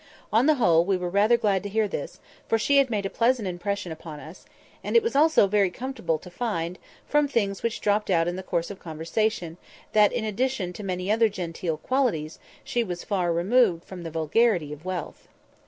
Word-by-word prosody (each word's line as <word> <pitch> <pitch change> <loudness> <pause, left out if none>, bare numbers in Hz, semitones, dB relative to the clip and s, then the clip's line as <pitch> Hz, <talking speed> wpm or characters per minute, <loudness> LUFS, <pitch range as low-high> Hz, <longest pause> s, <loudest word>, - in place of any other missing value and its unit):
On 230 +6 +4
the 310 - +5
whole, 170 - +4
we 190 +1 +1
were 180 -1 -4
rather 210 +5 +4
glad 205 -5 +1
to 205 - -6
hear 215 +1 +1
this, - - -6 0.3
for 225 - +2
she 280 +6 +2
had 275 -2 +4
made 205 -3 -1
a - - -1
pleasant 235 -3 +1
impression 185 0 -3
upon 160 -1 -8
us; 160 +5 -12 0.4
and - - -3
it 460 - +6
was 460 - -2
also 310 -5 +5
very 200 -1 +2
comfortable 240 -6 -3
to 180 +3 -13
find, 180 -4 -3 0.3
from 295 0 +3
things 200 -7 -1
which 230 -1 -2
dropped 210 0 +1
out 170 -2 +3
in 175 - -2
the 190 - -5
course 170 -1 -2
of 200 - -9
conversation, 170 +2 -2 0.4
that, 210 -1 +5
in 240 -3 -2
addition 215 -3 -1
to 210 - -8
many 185 0 -2
other 225 0 +4
genteel 170 -4 -4
qualities, 185 - -1 0.2
she 240 - 0
was 175 -5 -5
far 180 -4 0
removed 180 0 +2
from 185 -2 -9
the 165 - -5
"vulgarity 165 +1 +1
of 150 +3 -12
wealth." 185 -3 -5
195 Hz, 205 wpm, -25 LUFS, 175-230 Hz, 0.4 s, it